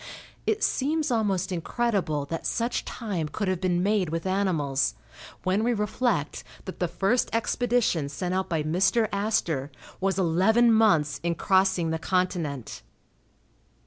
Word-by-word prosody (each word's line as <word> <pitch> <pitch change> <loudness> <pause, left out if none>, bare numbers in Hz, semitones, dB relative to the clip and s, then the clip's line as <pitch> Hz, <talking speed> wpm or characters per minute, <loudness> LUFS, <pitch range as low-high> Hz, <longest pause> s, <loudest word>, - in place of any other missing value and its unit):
It 440 0 +1
seems 300 +2 0
almost 195 -5 0
incredible 180 -5 -1
that 165 +3 -4
such 235 +1 -1
time 195 -9 -3
could 205 +6 -3
have 185 -1 -1
been 180 -1 +1
made 200 -4 +1
with 165 +2 -3
animals, 160 - 0 0.5
when 190 +4 +1
we 240 +1 +1
reflect 210 - -1 0.2
that 185 - -8
the 175 - +1
first 195 +8 +1
expedition 230 - +1
sent 180 +4 -3
out 190 0 -1
by 160 -3 0
Mr. 190 +8 +2
Astor, 200 -9 -1 0.3
was 195 0 0
eleven 195 +7 +4
months 170 -10 +3
in 170 0 -1
crossing 190 -2 +2
the 160 - -2
continent. 170 - -2
190 Hz, 140 wpm, -26 LUFS, 165-220 Hz, 0.5 s, eleven